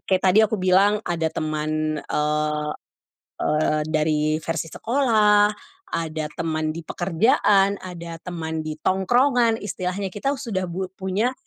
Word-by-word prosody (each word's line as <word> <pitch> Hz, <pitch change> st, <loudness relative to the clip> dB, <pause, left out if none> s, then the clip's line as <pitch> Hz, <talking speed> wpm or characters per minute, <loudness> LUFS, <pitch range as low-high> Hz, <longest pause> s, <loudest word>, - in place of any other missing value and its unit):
kayak 190 Hz, -1 st, +1 dB
tadi 190 Hz, +2 st, +4 dB
aku 220 Hz, -, -1 dB
bilang 195 Hz, +3 st, +4 dB
ada 170 Hz, -2 st, 0 dB
teman, 155 Hz, 0 st, -2 dB
eee, 150 Hz, 0 st, -1 dB, 0.7 s
eee, 150 Hz, 0 st, +1 dB
dari 155 Hz, 0 st, +1 dB
versi 160 Hz, -1 st, -3 dB
sekolah, 215 Hz, -5 st, +3 dB, 0.4 s
ada 160 Hz, -2 st, -3 dB
teman 155 Hz, -1 st, -1 dB
di 170 Hz, -, -6 dB
pekerjaan, 195 Hz, +3 st, +2 dB
ada 170 Hz, -2 st, -7 dB
teman 160 Hz, -3 st, -4 dB
di 155 Hz, 0 st, -5 dB
tongkrongan, 235 Hz, +5 st, +3 dB
istilahnya 195 Hz, -1 st, -3 dB
kita 275 Hz, +7 st, -1 dB
sudah 200 Hz, -7 st, -2 dB
bu 185 Hz, +2 st, -3 dB
punya 195 Hz, +7 st, -1 dB
180 Hz, 125 wpm, -23 LUFS, 155-205 Hz, 0.7 s, tadi